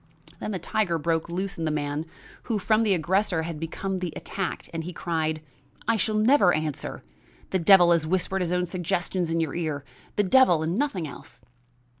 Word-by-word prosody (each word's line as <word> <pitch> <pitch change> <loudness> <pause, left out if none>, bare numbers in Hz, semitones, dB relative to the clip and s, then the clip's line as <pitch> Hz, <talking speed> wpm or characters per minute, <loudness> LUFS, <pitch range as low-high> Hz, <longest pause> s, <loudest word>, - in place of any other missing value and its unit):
Then - - -4
the 200 - -2
tiger 180 0 0
broke 165 +1 -1
loose 190 +2 -3
in 165 - -1
the - - +1
man 150 +1 -2 0.4
who 230 -3 0
from 215 +2 +2
the 210 -4 +3
aggressor 180 0 +1
had 160 -2 -5
become 185 +4 -3
the 180 -2 -3
attacked, 190 -4 -4
and 165 0 -3
he 180 +2 -6
cried: 160 -2 -2 0.4
"I 230 - +3
shall 215 +1 0
never 215 -3 +5
answer; 155 -2 -3 0.5
the 190 - +1
devil 175 0 +7
has 165 -2 +2
whispered 190 +2 0
his 175 -1 -1
own 180 0 +1
suggestions 175 0 -1
in 165 0 0
your 160 -4 -1
ear; 155 -5 -3 0.3
the 205 - +3
devil 185 -6 +5
and 165 +3 -1
nothing 210 - -1
else." 125 -3 -12
175 Hz, 190 wpm, -26 LUFS, 160-195 Hz, 0.5 s, devil